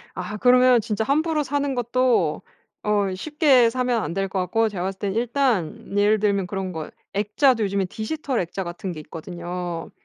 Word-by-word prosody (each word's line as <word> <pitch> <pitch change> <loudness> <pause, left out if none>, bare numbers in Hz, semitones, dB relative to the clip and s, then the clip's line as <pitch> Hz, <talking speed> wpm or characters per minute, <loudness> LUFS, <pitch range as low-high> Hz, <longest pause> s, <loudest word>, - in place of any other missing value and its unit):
아 185 +3 -5
그러면 250 +1 +5
진짜 215 0 -2
함부로 305 +4 +1
사는 285 0 -1
것도 240 -9 +1 0.4
어 205 -2 +1
쉽게 270 - +3
사면 250 -2 0
안 - - -4
될 195 +1 -1
것 190 - -2
같고 220 +5 +1
제가 185 -3 -4
봤을 190 0 -4
때는 200 0 -2
일단 230 - 0
예를 210 +1 +4
들면 200 -3 +1
그런 190 0 -4
거 160 -3 -6 0.2
액자도 215 +4 +2
요즘에 200 -1 0
디지털 250 - -3
액자 180 +2 -3
같은 175 +2 -5
게 160 - -7
있거든요. 175 +1 -6
210 Hz, 335 characters per minute, -23 LUFS, 185-250 Hz, 0.4 s, 그러면